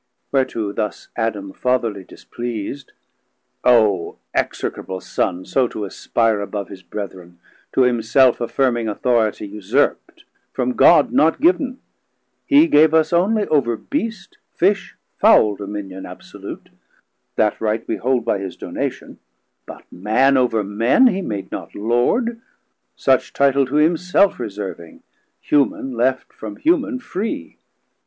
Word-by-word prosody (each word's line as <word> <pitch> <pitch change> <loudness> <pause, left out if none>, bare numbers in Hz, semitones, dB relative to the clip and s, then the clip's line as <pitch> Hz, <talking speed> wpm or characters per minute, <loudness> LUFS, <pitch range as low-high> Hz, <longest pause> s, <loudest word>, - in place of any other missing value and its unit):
Whereto 115 -6 0
thus 105 -2 -4
Adam 105 -4 -3
fatherly 115 -6 -1
displeas'd. 120 +6 -7 0.7
O 110 -8 +3 0.2
execrable 95 0 -3
Son 90 +1 -2
so 130 -2 +1
to 105 -2 -5
aspire 110 +2 0
Above 100 0 -5
his 95 -1 -10
Brethren, 95 -3 -8 0.4
to - - +3
himself 125 +1 +3
affirming 120 -1 0
Authoritie 110 -1 0
usurpt, 100 -1 -1 0.3
from 125 -1 -1
God 150 +1 +5
not 160 +2 +3
giv'n: 285 -5 +2 0.7
He 290 +2 +6
gave 155 - +4
us 160 -1 +3
onely 205 +5 +2
over 120 -7 +1
Beast, 230 - -5 0.2
Fish, 195 +3 +1 0.2
Fowl 105 -2 +5
Dominion 100 -2 -7
absolute; - - -10 0.7
that 105 -1 +1
right 110 0 -1
we - - -2
hold 125 -1 0
By 100 - 0
his 95 -2 -6
donation; - - -5 0.5
but - - -10
Man 110 +9 +2
over 125 -4 +2
men 115 - +3
He 195 -6 +3
made 105 - -5
not - - -7
Lord; 125 - 0 0.5
such - - +1
title 140 -1 +3
to 135 - -4
himself 175 +5 +3
70 - - -7
Reserving, 95 -5 -8 0.4
human 135 -2 0
left 130 +2 -1
from 105 -2 -8
human 295 -5 +1
free. 205 - -5
120 Hz, 125 wpm, -20 LUFS, 105-150 Hz, 0.7 s, He